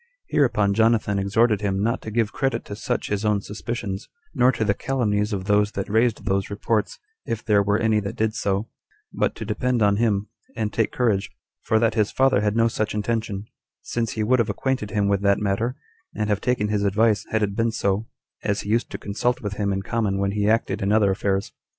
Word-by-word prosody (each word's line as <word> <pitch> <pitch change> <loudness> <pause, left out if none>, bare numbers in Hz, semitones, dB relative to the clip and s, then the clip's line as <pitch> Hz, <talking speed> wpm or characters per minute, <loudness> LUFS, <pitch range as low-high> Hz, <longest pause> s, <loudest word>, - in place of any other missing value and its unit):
Hereupon 115 -8 +2
Jonathan 110 -2 +2
exhorted 105 +2 +2
him 100 -1 0
not 115 +4 0
to - - -6
give 110 -1 0
credit 135 -2 -1
to 100 - -6
such 105 - -2
his 105 0 -1
own 105 -1 +2
suspicions, 105 -1 -5 0.2
nor 125 +1 +4
to 110 -3 -1
the 100 - +3
calumnies 105 -4 0
of 95 -2 -3
those 105 0 +2
that 100 - -3
raised 110 -1 +1
those 95 0 0
reports, 105 +1 -1 0.3
if 115 - -3
there 105 -2 +4
were 100 +1 +2
any 110 -1 +2
that 100 -1 -5
did 110 0 0
so, 100 0 -1 0.5
but - - 0
to 110 - -6
depend 120 +2 0
on 100 -1 +3
him, 105 -3 +1 0.3
and 110 -2 -2
take 110 - +1
courage; 105 -6 +1 0.3
for 110 - +1
that 115 0 +2
his 105 -2 +1
father 135 -5 +3
had 105 0 0
no 115 0 +4
such 110 -2 -2
intention, 105 -2 -2 0.4
since 115 -2 -2
he 110 - -1
would 125 +4 +3
have 115 - +1
acquainted 130 -6 -1
him 105 -2 0
with 100 -1 +1
that 100 -1 +3
matter, 105 +5 -1 0.4
and 105 0 -1
have 100 - 0
taken 120 -4 0
his 105 -1 0
advice, 105 +2 +2
had 110 -1 +1
it 100 -1 -1
been 115 +1 +1
so, 105 0 -1 0.4
as 100 -1 0
he 105 - -4
used 115 +2 +1
to - - -5
consult 120 +5 -1
with 105 -1 -4
him 100 -1 0
in 95 0 -2
common 105 -3 -1
when 100 0 0
he 105 0 +1
acted 115 +1 +1
in 100 +1 +1
other 105 -2 +4
affairs. 95 0 -1
105 Hz, 220 wpm, -23 LUFS, 100-115 Hz, 0.5 s, nor